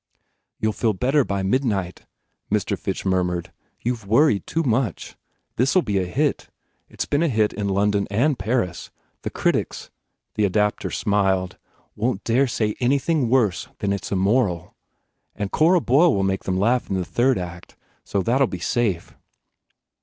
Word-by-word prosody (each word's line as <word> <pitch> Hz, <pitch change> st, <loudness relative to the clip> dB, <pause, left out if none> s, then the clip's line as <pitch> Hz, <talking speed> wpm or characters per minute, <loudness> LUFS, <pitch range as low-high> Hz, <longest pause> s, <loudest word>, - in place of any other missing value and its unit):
"You 110 Hz, -, +1 dB
ll -, -, -9 dB
feel 110 Hz, -1 st, +1 dB
better 135 Hz, +9 st, +2 dB
by 100 Hz, -4 st, -2 dB
midnight," 100 Hz, -5 st, -1 dB, 0.4 s
Mr. -, -, 0 dB
Fitch -, -, -4 dB
murmured, 90 Hz, -2 st, 0 dB, 0.3 s
"You 125 Hz, +2 st, 0 dB
ve 110 Hz, -4 st, -15 dB
worried 115 Hz, -, +3 dB
too 165 Hz, -, -1 dB
much. 120 Hz, -, -1 dB, 0.4 s
This 130 Hz, +8 st, +2 dB
ll 185 Hz, -, +6 dB
be 100 Hz, -3 st, 0 dB
a 90 Hz, -, -2 dB
hit. 90 Hz, -, -1 dB, 0.4 s
It -, -, -8 dB
s -, -, +1 dB
been 145 Hz, -, 0 dB
a 170 Hz, -, +3 dB
hit 110 Hz, -4 st, +1 dB
in 100 Hz, -1 st, -2 dB
London 100 Hz, +1 st, +1 dB
and 125 Hz, +7 st, +1 dB
Paris. 95 Hz, -4 st, -1 dB, 0.3 s
The -, -, -3 dB
critics" -, -, -1 dB, 0.4 s
the 105 Hz, -, 0 dB
adapter 105 Hz, +1 st, +1 dB
smiled 95 Hz, -3 st, 0 dB, 0.4 s
"won 115 Hz, +3 st, 0 dB
t 105 Hz, +4 st, -4 dB
dare 135 Hz, +3 st, +4 dB
say 110 Hz, -3 st, -1 dB
anything 135 Hz, +1 st, +1 dB
worse 115 Hz, -8 st, +2 dB
than 100 Hz, -, -1 dB
that 100 Hz, -, +1 dB
it 95 Hz, -, -10 dB
s -, -, -7 dB
immoral. 95 Hz, -3 st, +1 dB, 0.6 s
And 100 Hz, -1 st, -4 dB
Cora 170 Hz, +3 st, +4 dB
Boyle 150 Hz, +5 st, +4 dB
will 100 Hz, -, +1 dB
make 95 Hz, 0 st, -1 dB
them 95 Hz, -1 st, 0 dB
laugh 120 Hz, +6 st, +1 dB
in 95 Hz, -, -1 dB
the 90 Hz, -1 st, -1 dB
third 125 Hz, +5 st, +2 dB
act, 90 Hz, -1 st, -7 dB, 0.3 s
so 100 Hz, -2 st, -1 dB
that 125 Hz, +6 st, +1 dB
ll 135 Hz, -, +5 dB
be 95 Hz, -, -5 dB
safe." 95 Hz, -1 st, -1 dB
105 Hz, 180 wpm, -23 LUFS, 95-125 Hz, 0.6 s, ll